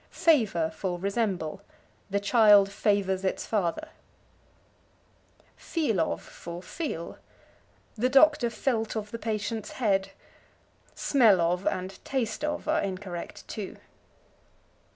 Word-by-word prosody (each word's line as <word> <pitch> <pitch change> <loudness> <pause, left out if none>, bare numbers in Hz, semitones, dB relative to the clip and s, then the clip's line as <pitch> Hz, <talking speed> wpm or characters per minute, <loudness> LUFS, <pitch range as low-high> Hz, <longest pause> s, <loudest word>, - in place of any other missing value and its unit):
Favor 215 - +2
for 180 +2 -3
Resemble. 195 -4 -2 0.5
"The 200 +1 0
child 205 -2 +5
favors 195 -2 +1
its 190 - -1
father." 210 - -1 1.7
Feel 290 - -1
of 160 - -2
for 170 +1 -9
Feel. 185 - -5 0.7
"The 240 +3 0
doctor 275 -2 +5
felt 230 -2 -1
of 210 -1 -4
the 230 - -5
patient's 215 -1 -3
head." 195 -6 +1 0.9
"Smell 225 -9 +4
of" 175 +2 0
and 185 +1 -3
"taste 260 0 -2
of" 300 0 -2
are 315 +1 +2
incorrect 185 -2 -6
too. 205 -3 -6
205 Hz, 110 wpm, -28 LUFS, 185-235 Hz, 1.7 s, child